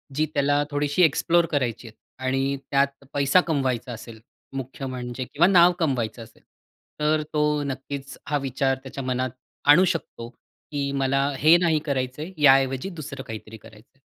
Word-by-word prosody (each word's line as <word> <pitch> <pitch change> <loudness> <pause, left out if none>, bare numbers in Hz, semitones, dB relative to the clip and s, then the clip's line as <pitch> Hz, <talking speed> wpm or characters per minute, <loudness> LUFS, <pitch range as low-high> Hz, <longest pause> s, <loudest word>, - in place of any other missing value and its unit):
जी 155 +2 +2
त्याला 145 0 +2
थोडीशी 145 +3 0
एक्सप्लोर 170 +2 +3
करायची 120 -5 -1
आहेत 110 - -14 0.3
आणि 135 +1 0
त्यात 140 0 0
पैसा 140 +5 +4
कमवायचा 130 -5 -1
असेल 115 0 -10 0.4
मुख्य 135 +1 -5
म्हणजे 125 -1 -5
किंवा 160 +7 +2
नाव 180 -2 +6
कमवायचं 125 -7 -1
असेल. 110 - -19 0.6
तर 155 +1 +2
तो 150 -1 +1
नक्कीच 140 0 -6
हा 145 0 +1
विचार 135 +1 0
त्याच्या 135 0 -7
मनात 130 0 -1 0.4
आणू 170 +6 +8
शकतो 140 -9 -3
की 140 +3 -7
"मला 135 0 +1
हे 155 +5 +6
नाही 170 -3 +2
करायच 130 -2 -2
आहे, 165 +5 -6
याऐवजी 135 +2 +4
दुसरं 155 -5 -7
काहीतरी 110 0 -9
करायच 105 0 -16
आहे." - - -32
140 Hz, 155 wpm, -24 LUFS, 130-150 Hz, 0.6 s, आणू